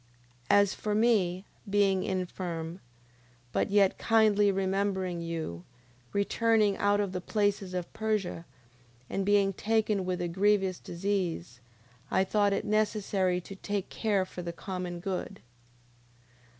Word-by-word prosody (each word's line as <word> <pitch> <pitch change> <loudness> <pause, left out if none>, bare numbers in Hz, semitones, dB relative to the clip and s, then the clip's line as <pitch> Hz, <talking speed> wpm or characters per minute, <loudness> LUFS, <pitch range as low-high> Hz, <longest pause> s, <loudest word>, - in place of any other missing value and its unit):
9:21. - - +6
As 200 -1 +3
for 210 -1 -2
me, 205 -5 +2 0.2
being 195 -2 +3
infirm, 180 -2 -3 0.7
but - - 0
yet 200 -1 +3
kindly 215 -3 +4
remembering 190 -2 -1
you, 160 - -4 0.5
returning 210 0 +2
out 205 0 +2
of 200 -2 0
the 185 -1 -4
places 200 -2 0
of 180 -1 -4
Persia, 215 -6 -1 0.7
and 195 - 0
being 200 0 +3
taken 215 -1 +1
with 180 0 -2
a 175 - -1
grievous 190 +1 +2
disease, 170 - -3 0.5
I 190 - +3
thought 205 +1 +2
it 200 +2 -1
necessary 205 -4 +1
to 195 - -10
take 200 0 -3
care 205 -4 0
for 180 - -8
the 170 -1 -4
common 180 -1 -5
good: 190 -1 -3
9:22. - - -16
195 Hz, 135 wpm, -29 LUFS, 180-205 Hz, 0.7 s, 9:21